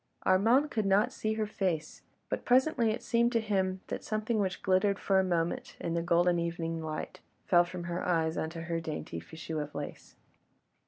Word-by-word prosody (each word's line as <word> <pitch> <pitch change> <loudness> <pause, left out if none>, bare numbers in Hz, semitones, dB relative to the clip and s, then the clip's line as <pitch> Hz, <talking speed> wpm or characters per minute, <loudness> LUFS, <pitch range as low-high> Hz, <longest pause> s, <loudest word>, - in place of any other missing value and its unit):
Armand 235 +10 +4
could 215 -3 0
not 195 +2 +3
see 215 0 -1
her 220 0 -1
face, 180 -7 -2 0.3
but - - -3
presently 255 -2 +3
it 220 +2 -2
seemed 235 0 +2
to 230 - +3
him 190 -3 0
that - - -5
something 215 +1 -1
which 190 -2 -1
glittered 190 +1 +3
for 195 -1 +2
a - - +3
moment 170 -2 -1
in 165 - -2
the 170 - 0
golden 175 +1 +3
evening 165 -1 -2
light, 155 -1 -5 0.3
fell 175 -1 +5
from 175 0 -6
her 175 +1 -3
eyes 165 -2 +1
onto 165 +1 -3
her 170 0 -2
dainty 155 - -5
fichu 160 - -5
of 150 0 -7
lace. 145 0 -7
185 Hz, 190 wpm, -31 LUFS, 165-215 Hz, 0.3 s, fell